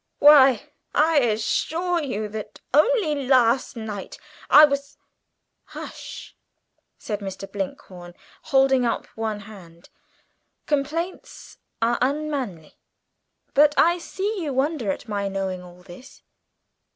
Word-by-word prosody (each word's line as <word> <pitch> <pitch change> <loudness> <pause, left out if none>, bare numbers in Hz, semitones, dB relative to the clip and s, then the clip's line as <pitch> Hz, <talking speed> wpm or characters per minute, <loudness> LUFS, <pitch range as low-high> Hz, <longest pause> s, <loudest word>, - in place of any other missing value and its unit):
Why, 275 -5 +7 0.3
I 310 0 +4
assure 320 +9 0
you, 215 -7 -3
that 215 0 -8
only 335 - +3
last 255 -1 +3
night 215 -4 -7 0.3
I 305 - +9
was 280 -1 -4 0.3
" - - -54
"Hush," - - -9 0.6
said 210 -2 -5
Mr. 195 -1 -6
Blinkhorn, 180 -3 -7 0.3
holding 270 -1 +3
up 235 - -1
one 220 -2 -3
hand, 185 -5 -14 0.8
"complaints 315 +5 -4 0.2
are 235 +1 +1
unmanly. 265 - -3 0.7
But 295 +1 +5
I 345 +2 +4
see 395 +4 -4
you 295 -4 -3
wonder 265 -4 -1
at 190 - -7
my 200 -2 -2
knowing 190 -2 -3
all 180 0 -15
this?" 190 +8 -14
255 Hz, 115 wpm, -23 LUFS, 200-300 Hz, 0.8 s, I